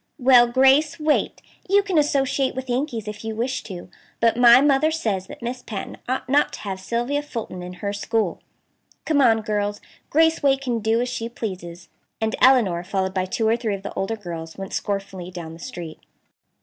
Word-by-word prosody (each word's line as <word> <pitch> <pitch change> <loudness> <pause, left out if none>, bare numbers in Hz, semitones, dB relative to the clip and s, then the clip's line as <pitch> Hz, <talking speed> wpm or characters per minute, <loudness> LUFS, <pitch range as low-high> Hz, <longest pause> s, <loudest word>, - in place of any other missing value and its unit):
"Well, 250 -3 +6
Grace 270 +6 +4
Waite, 305 -1 0 0.3
you 400 +1 +4
can 375 -5 +1
associate 275 -2 +1
with 260 -1 -4
Yankees 245 -4 -2
if 210 +1 -7
you 220 0 -4
wish 255 +4 -2
to. 180 -4 -8 0.3
But 230 -1 +3
my 240 0 +8
mother 285 +2 +3
says 215 - -2
that - - -11
Miss 250 +1 -4
Patten 205 -4 -6
ought 260 0 -2
not 285 +3 +2
to - - -7
have 195 -2 -5
Sylvia 240 +8 -1
Fulton 230 -10 -6
in 180 0 -7
her 200 - -1
school. 210 -2 -1 0.6
Come 300 -3 +2
on, 225 -4 +4
girls; 205 -1 -2 0.3
Grace 320 +1 +3
Waite 275 -1 +3
can 245 -4 -1
do 225 +2 +1
as 250 - -1
she 235 -2 -4
pleases," 180 -7 -7 0.3
and 220 0 -1
Elinor, 220 -10 +4
followed 190 0 -2
by 185 -1 0
two 220 +4 -1
or 225 - +4
three 225 -4 -2
of 195 - -10
the 200 - -6
older 195 +4 -2
girls, 165 -5 -8
went 195 0 -7
scornfully 195 -3 -3
down 170 -3 -8
the 165 - -12
street. 170 -7 -8
230 Hz, 195 wpm, -23 LUFS, 195-265 Hz, 0.6 s, my